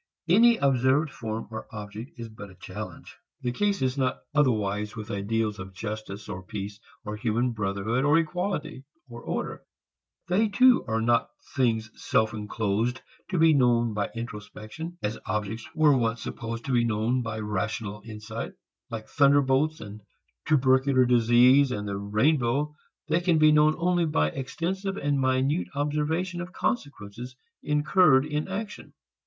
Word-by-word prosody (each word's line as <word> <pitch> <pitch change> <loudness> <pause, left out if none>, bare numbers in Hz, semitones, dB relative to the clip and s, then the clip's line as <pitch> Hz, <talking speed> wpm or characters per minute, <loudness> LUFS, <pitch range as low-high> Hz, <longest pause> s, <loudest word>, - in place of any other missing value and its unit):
Any 230 +7 +6
observed 135 - +2
form 110 -2 -5
or 110 - -6
object 105 +3 -8
is 115 -1 -6
but 105 -2 -10
a 95 - -15
challenge. - - -9 0.2
The 125 - 0
case 200 +5 0
is 130 +1 0
not 130 -1 -1
otherwise 105 -7 +1
with 110 +1 -7
ideals 105 +1 -1
of 95 0 -8
justice 110 0 -6
or 95 - -6
peace 100 +1 -6 0.3
or 105 0 -4
human 120 +3 0
brotherhood, 105 +3 -1
or 145 +3 +4
equality, 165 -4 -2 0.2
or 120 -1 -10
order. - - -4 0.7
They 195 +5 +2
too 250 +4 +5
are 110 0 0
not 120 0 +2 0.3
things 110 -4 +1
self 110 0 0
enclosed 110 +3 -1 0.3
to 185 - -1
be 160 -1 +6
known 120 -4 +3
by 105 -1 -1
introspection, 115 - -7
as 105 +2 -2
objects 105 +3 -3
were 155 -3 +5
once 115 -2 0
supposed 115 0 -5
to 135 - -3
be 120 -2 +3
known 115 +3 0
by 115 -2 -4
rational 105 0 -3
insight. 110 +1 -7 0.4
Like 110 -2 -6
thunderbolts 140 +2 +3
and 105 0 -9 0.5
tubercular 130 -2 +4
disease 125 +3 +5
and 105 -3 -3
the 100 - -3
rainbow 130 +7 +1 0.3
they 160 +3 +2
can 175 -2 +3
be 155 0 +6
known 150 +1 +4
only 175 0 +2
by 75 - +1
extensive 190 - -3
and 145 -1 0
minute 130 - +1
observation 155 +5 -1
of 180 +1 -8
consequences 125 - -4 0.3
incurred 150 -1 +4
in 150 0 -2
action. 205 +2 -6
125 Hz, 150 wpm, -27 LUFS, 110-150 Hz, 0.7 s, Any